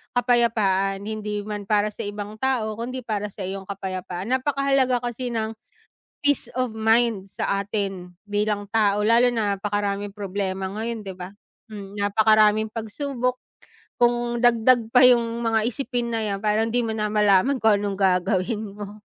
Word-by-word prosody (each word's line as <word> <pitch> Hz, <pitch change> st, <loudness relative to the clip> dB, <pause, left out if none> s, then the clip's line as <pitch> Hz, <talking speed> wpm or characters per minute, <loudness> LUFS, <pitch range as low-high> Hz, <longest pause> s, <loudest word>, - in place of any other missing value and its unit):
kapayapaan. 210 Hz, -6 st, +2 dB
Hindi 210 Hz, -1 st, -4 dB
man 205 Hz, -1 st, -6 dB
para 210 Hz, -1 st, +2 dB
sa 205 Hz, -, -6 dB
ibang 205 Hz, +1 st, -7 dB
tao, 230 Hz, -5 st, -1 dB
kung 235 Hz, -, -3 dB
‘di 255 Hz, -, -5 dB
para 210 Hz, -2 st, -2 dB
sa 200 Hz, -1 st, -8 dB
iyong 190 Hz, +1 st, -5 dB
kapayapaan. 185 Hz, 0 st, -5 dB
Napakahalaga 265 Hz, -2 st, +1 dB
kasi 245 Hz, +1 st, -4 dB
ng 225 Hz, -2 st, -2 dB, 0.7 s
peace 290 Hz, -1 st, 0 dB
of 255 Hz, -3 st, -2 dB
mind 220 Hz, -3 st, +1 dB
sa 200 Hz, 0 st, -1 dB
atin 195 Hz, -3 st, -4 dB, 0.2 s
bilang 205 Hz, 0 st, -1 dB
tao, 210 Hz, -1 st, +3 dB
lalo 240 Hz, +2 st, +5 dB
na 210 Hz, -4 st, 0 dB
napakaraming 205 Hz, 0 st, -2 dB
problema 195 Hz, -1 st, -3 dB
ngayon 220 Hz, +3 st, -4 dB
'di 190 Hz, -, -6 dB
ba. 180 Hz, 0 st, -8 dB, 0.4 s
Mm, 200 Hz, -1 st, -9 dB
napakaraming 215 Hz, +1 st, +3 dB
pagsubok 250 Hz, +3 st, -3 dB, 0.6 s
kung 240 Hz, 0 st, +1 dB
dagdag 235 Hz, -1 st, +4 dB
pa 250 Hz, +1 st, +7 dB
yung 235 Hz, -2 st, +3 dB
mga 225 Hz, -1 st, +2 dB
isipin 245 Hz, -1 st, -3 dB
na 230 Hz, -, -1 dB
‘yan, 200 Hz, -1 st, -3 dB
parang 215 Hz, +1 st, +2 dB
‘di 240 Hz, +2 st, 0 dB
mo 225 Hz, -, -2 dB
na 215 Hz, -1 st, -1 dB
malaman 210 Hz, +5 st, +3 dB
kung 220 Hz, -2 st, +5 dB
anong 200 Hz, -1 st, -2 dB
gagawin 195 Hz, +2 st, 0 dB
mo. 205 Hz, 0 st, -8 dB
215 Hz, 155 wpm, -24 LUFS, 200-235 Hz, 0.7 s, pa